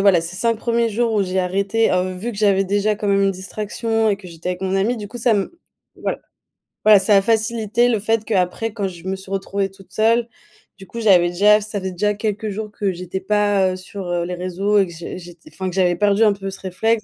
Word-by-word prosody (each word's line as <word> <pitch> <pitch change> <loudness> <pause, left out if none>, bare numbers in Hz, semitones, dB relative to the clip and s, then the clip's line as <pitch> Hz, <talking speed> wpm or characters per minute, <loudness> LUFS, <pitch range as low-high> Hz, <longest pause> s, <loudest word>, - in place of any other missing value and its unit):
voilà 195 -4 +5
ces 170 +2 -6
5 230 +3 +1
1ers 235 0 0
jours 230 +1 0
où 205 - +3
j'ai 185 0 -2
arrêté, 200 +5 +1
heu, 185 0 0
vu 205 +7 -4
que - - -10
j'avais 200 -2 +3
déjà 205 +2 +1
quand 205 0 -3
même 200 0 +3
une 195 - +3
distraction 215 +4 -2
et 200 - +1
que 190 -2 -11
j'étais 170 +1 -5
avec 180 0 -5
mon 190 0 -1
amie, 225 +5 0
du 205 -1 -7
coup 245 - -9
ça 235 0 +3
me 210 - -2 0.4
voilà - - -3 0.7
voilà, 215 -2 +8
ça 205 +1 +3
a - - +5
facilité 225 +2 +1
le 225 -3 +1
fait 225 +1 0
qu'après 205 +2 0
quand 205 -3 -2
je 175 -2 -10
me 190 - -1
suis 190 0 -12
retrouvée 195 0 -2
toute 195 -1 -18
seule, 225 +4 +2 0.5
du 195 - -12
coup 235 - -7
j'avais 180 -5 +5
déjà 205 +4 +5
ça 210 0 -4
faisait 190 0 -3
déjà 210 +4 0
quelques 210 0 -2
jours 210 +1 -5
que 205 -2 -1
j'étais 180 +1 -5
pas, 205 -2 +2
heu, - - -4
sur, 185 +1 -8
heu, 175 -1 -1
les 180 - -4
réseaux 185 +3 0
et 195 - +2
que 170 - -10
j'ai 170 +1 -7
j'ét 175 -1 -12
enfin 190 -1 -4
que 180 - -7
j'avais 180 -2 +3
perdu 205 +1 +3
un 215 - +5
peu 195 -1 -6
ce 195 - -9
réflexe, 215 +4 0
200 Hz, 250 wpm, -20 LUFS, 185-215 Hz, 0.7 s, voilà